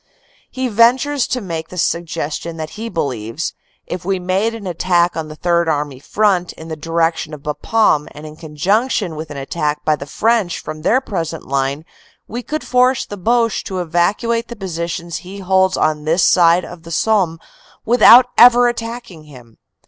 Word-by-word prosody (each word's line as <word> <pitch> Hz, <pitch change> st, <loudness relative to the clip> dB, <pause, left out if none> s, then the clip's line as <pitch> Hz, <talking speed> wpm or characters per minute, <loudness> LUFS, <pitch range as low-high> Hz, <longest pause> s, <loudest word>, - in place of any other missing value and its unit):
He 260 Hz, 0 st, -3 dB
ven 235 Hz, +2 st, +5 dB
tures 290 Hz, -2 st, -2 dB
to 250 Hz, -, -1 dB
make 165 Hz, -5 st, -5 dB
the 180 Hz, -, -10 dB
suggestion 165 Hz, -1 st, -2 dB
that 155 Hz, -1 st, -6 dB
he 225 Hz, +2 st, -6 dB
believes, 130 Hz, -, -3 dB, 0.3 s
"if 180 Hz, 0 st, -6 dB
we 190 Hz, +1 st, 0 dB
made 190 Hz, +5 st, -1 dB
an 220 Hz, -3 st, -9 dB
attack 175 Hz, 0 st, +1 dB
on 160 Hz, -1 st, -4 dB
the 155 Hz, -, -9 dB
Third 170 Hz, 0 st, +1 dB
Army 145 Hz, -3 st, -2 dB
front 185 Hz, +2 st, 0 dB
in 160 Hz, +1 st, -11 dB
the 160 Hz, -, -4 dB
direction 165 Hz, 0 st, -1 dB
of 145 Hz, -, -15 dB
Bapaume, 150 Hz, +2 st, +1 dB
and 150 Hz, +1 st, -10 dB
in 155 Hz, 0 st, -10 dB
conjunction 180 Hz, -, -1 dB
with 155 Hz, 0 st, -7 dB
an 145 Hz, -, -7 dB
attack 150 Hz, +2 st, -3 dB
by 155 Hz, -, +3 dB
the 140 Hz, -1 st, -9 dB
French 220 Hz, 0 st, 0 dB
from 155 Hz, 0 st, -7 dB
their 250 Hz, +11 st, +2 dB
present 165 Hz, -, -4 dB
line, 140 Hz, +3 st, -1 dB, 0.4 s
we 240 Hz, +3 st, -5 dB
could 310 Hz, +5 st, -5 dB
force 250 Hz, 0 st, +2 dB
the 205 Hz, -, -7 dB
Boche 230 Hz, +3 st, +1 dB
to 190 Hz, -, -5 dB
evacuate 190 Hz, +7 st, 0 dB
the 235 Hz, -, -8 dB
positions 170 Hz, -3 st, -4 dB
he 185 Hz, +4 st, -10 dB
holds 190 Hz, -1 st, +2 dB
on 155 Hz, -1 st, 0 dB
this 165 Hz, +3 st, +2 dB
side 175 Hz, 0 st, +4 dB
of 175 Hz, -1 st, -11 dB
the 165 Hz, -, -12 dB
Somme 180 Hz, -2 st, +1 dB, 0.5 s
without 245 Hz, +1 st, +7 dB
ever 245 Hz, 0 st, +7 dB
attacking 230 Hz, -8 st, -5 dB
him." 125 Hz, -6 st, -16 dB
175 Hz, 180 wpm, -18 LUFS, 155-220 Hz, 0.5 s, without